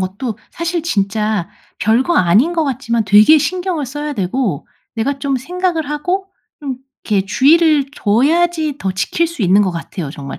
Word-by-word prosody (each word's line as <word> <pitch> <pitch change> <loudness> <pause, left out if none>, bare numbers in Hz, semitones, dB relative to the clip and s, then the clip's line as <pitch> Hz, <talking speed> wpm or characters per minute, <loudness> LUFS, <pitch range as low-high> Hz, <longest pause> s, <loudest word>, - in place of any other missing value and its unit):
것도 200 +5 -4
사실 335 0 -3
진짜 210 - -1 0.3
별거 240 - +2
아닌 205 - +3
것 330 -2 0
같지만 240 -4 -1
되게 210 +10 +6
신경을 360 -1 -2
써야 295 +3 -5
되고 200 - -2 0.3
내가 270 +5 -2
좀 275 -1 -1
생각을 340 +2 -2
하고 360 +6 -2 0.3
좀 270 -3 -4 0.3
이렇게 200 -3 0
주의를 300 - +4
줘야지 310 +7 +1
더 190 -6 -2
지킬 190 - 0
수 335 -8 -6
있는 195 +2 +4
것 190 - 0
같아요 170 -2 -6
정말. 140 -2 -8
265 Hz, 305 characters per minute, -17 LUFS, 205-320 Hz, 0.3 s, 되게